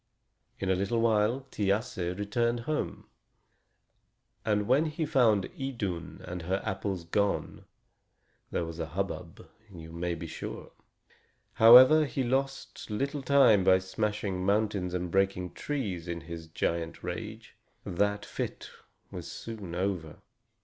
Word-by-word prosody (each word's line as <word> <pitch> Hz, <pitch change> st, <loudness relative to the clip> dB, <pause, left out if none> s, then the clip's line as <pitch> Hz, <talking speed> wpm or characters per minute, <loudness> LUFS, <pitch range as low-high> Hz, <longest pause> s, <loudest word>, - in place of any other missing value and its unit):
In 95 Hz, -, -1 dB
a -, -, +3 dB
little 100 Hz, +5 st, 0 dB
while 115 Hz, +3 st, +2 dB
Thiasse 100 Hz, -3 st, -1 dB
returned 115 Hz, +3 st, 0 dB
home, 150 Hz, +5 st, -3 dB, 1.4 s
and 105 Hz, -2 st, +1 dB
when 140 Hz, +6 st, +4 dB
he 155 Hz, +1 st, -2 dB
found 120 Hz, -9 st, +3 dB
Idun 100 Hz, -11 st, -4 dB
and 90 Hz, 0 st, -5 dB
her 95 Hz, +4 st, -1 dB
apples 95 Hz, -2 st, -2 dB
gone, 100 Hz, +4 st, -1 dB, 0.8 s
there 85 Hz, -, -1 dB
was 80 Hz, 0 st, -7 dB
a 80 Hz, -, -2 dB
hubbub, 90 Hz, -1 st, -5 dB, 0.2 s
you 80 Hz, -3 st, -10 dB
may 85 Hz, +1 st, -2 dB
be 85 Hz, -, -7 dB
sure! 80 Hz, -, -7 dB, 0.8 s
However, 130 Hz, +7 st, +9 dB
he 135 Hz, -1 st, -2 dB
lost 135 Hz, +1 st, -2 dB
little 140 Hz, +7 st, -2 dB
time 130 Hz, -7 st, +5 dB
by 95 Hz, 0 st, +6 dB
smashing 100 Hz, 0 st, -2 dB
mountains 100 Hz, -2 st, +1 dB
and 90 Hz, -1 st, -3 dB
breaking 95 Hz, -1 st, +1 dB
trees 100 Hz, -, -3 dB
in 85 Hz, -1 st, -4 dB
his 80 Hz, 0 st, -8 dB
giant 85 Hz, +1 st, -2 dB
rage; 110 Hz, +5 st, -6 dB, 0.3 s
that 100 Hz, +3 st, 0 dB
fit -, -, -5 dB, 0.4 s
was -, -, -7 dB
soon 105 Hz, -7 st, -7 dB
over. 90 Hz, -4 st, -2 dB
100 Hz, 130 wpm, -29 LUFS, 90-115 Hz, 1.4 s, However